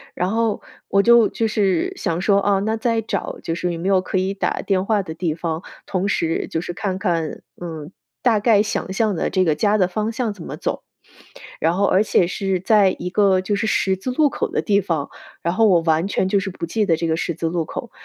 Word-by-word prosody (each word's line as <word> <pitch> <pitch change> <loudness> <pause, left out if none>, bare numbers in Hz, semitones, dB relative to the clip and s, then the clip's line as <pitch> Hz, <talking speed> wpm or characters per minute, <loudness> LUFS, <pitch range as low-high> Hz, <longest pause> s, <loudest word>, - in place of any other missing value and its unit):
然 180 +2 -1
后 225 -1 0 0.3
我 200 0 +3
就 235 -1 +6
就 225 - -1
是 215 - +1
想 175 - -2
说， 200 +2 +3
啊， 200 0 +2
那 220 +2 0
再 230 0 0
找 225 - -4
就 165 - -2
是 175 +1 -2
有 170 - -4
没 185 - -3
有 190 -1 +3
可 185 - -2
以 190 +1 0
打 200 - -2
电 190 -2 +1
话 205 -1 +1
的 160 - -7
地 160 -1 -2
方， 165 0 -3 0.2
同 190 +1 -1
时 165 -5 -1
就 160 - -1
是 175 - -5
看 190 0 -3
看 170 -6 -2 0.2
嗯， 160 -1 -7 0.3
大 230 -4 +4
概 210 -1 +4
想 205 -2 -3
象 210 0 +1
的 - - -1
这 185 -1 +2
个 155 - +3
家 210 +6 +2
的 185 -3 +3
方 215 +4 -2
向 230 -2 -2
怎 180 -5 -11
么 - - -7
走。 - - -3 0.8
然 165 +2 +2
后 200 +2 +2
而 190 - +3
且 185 - +3
是 190 +1 -1
在 195 -1 +3
一 180 - -4
个 195 -3 +3
就 205 +2 -1
是 220 +2 -1
十 190 -2 +1
字 190 +7 -5
路 295 +2 +3
口 - - -2
的 - - -1
地 200 -1 +2
方， 165 -6 -2 0.3
然 170 +1 0
后 225 +2 +4
我 175 -4 +4
完 165 +2 +1
全 190 - 0
就 200 +1 +2
是 195 0 -3
不 175 - -5
记 210 +5 -1
得 165 - +4
这 165 - -2
个 160 - +1
十 170 -2 -2
字 165 - -2
路 165 -1 -1
口， - - -7
190 Hz, 265 characters per minute, -21 LUFS, 175-210 Hz, 0.8 s, 就